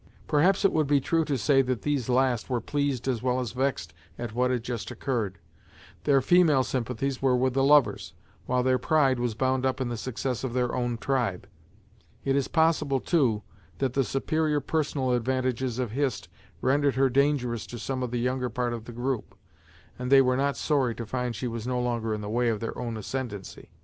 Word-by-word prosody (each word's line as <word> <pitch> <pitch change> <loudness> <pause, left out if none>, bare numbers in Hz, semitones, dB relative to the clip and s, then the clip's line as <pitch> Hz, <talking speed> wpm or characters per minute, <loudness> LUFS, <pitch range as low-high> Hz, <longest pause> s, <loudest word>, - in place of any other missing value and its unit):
Perhaps 185 +7 +3
it 195 - +5
would 155 -2 +2
be 145 0 +4
true 165 +4 +1
to 140 -3 -1
say 135 +2 +4
that 130 -2 -2
these 140 -5 -1
last 125 -2 +1
were 125 -2 0
pleased 140 0 -2
as 125 -4 0
well 125 0 +1
as 125 -4 -3
vexed 125 -11 -2 0.2
at 120 -2 -5
what 125 +2 +1
had 125 -3 -1
just 120 -2 -4
occurred. 110 -9 -2 0.7
Their 140 -2 +4
female 155 -2 +4
sympathies 130 +1 -2
were 130 -2 +3
with 130 0 +1
the 135 0 +2
lovers, 145 0 +3 0.3
while 125 0 +1
their 130 0 +2
pride 135 -2 +2
was 120 -3 -1
bound 130 +1 0
up 130 0 0
in 130 -2 -1
the 120 - -3
success 130 +1 -3
of 130 -3 -3
their 125 -1 0
own 120 -2 -1
tribe. 120 -8 -1 0.8
It 135 0 +2
is 140 -2 +1
possible, 160 -4 +2
too, 125 - +1 0.3
that 135 -2 -1
the 135 - +2
superior 150 +3 0
personal 145 -4 -1
advantages 125 0 0
of 125 -4 -2
Hist 135 0 -2 0.3
rendered 140 +2 +2
her 135 +1 +4
dangerous 130 -4 +1
to 120 - -7
some 130 +2 -3
of 125 - -2
the 120 - -2
younger 125 +1 -1
part 120 +1 -2
of 115 -1 -6
the 120 - -8
group, 125 0 -3 0.6
and 125 +1 -3
they 135 -1 +8
were 130 0 +2
not 140 +1 0
sorry 135 -6 +1
to 115 - -5
find 125 +1 -3
she 125 - -3
was 115 0 -5
no 125 -1 0
longer 120 -2 -1
in 105 -1 -2
the 105 - -5
way 120 +3 +1
of 110 -2 -1
their 115 - -4
own 120 -2 -4
ascendency. 110 -3 -6
130 Hz, 205 wpm, -27 LUFS, 120-135 Hz, 0.8 s, they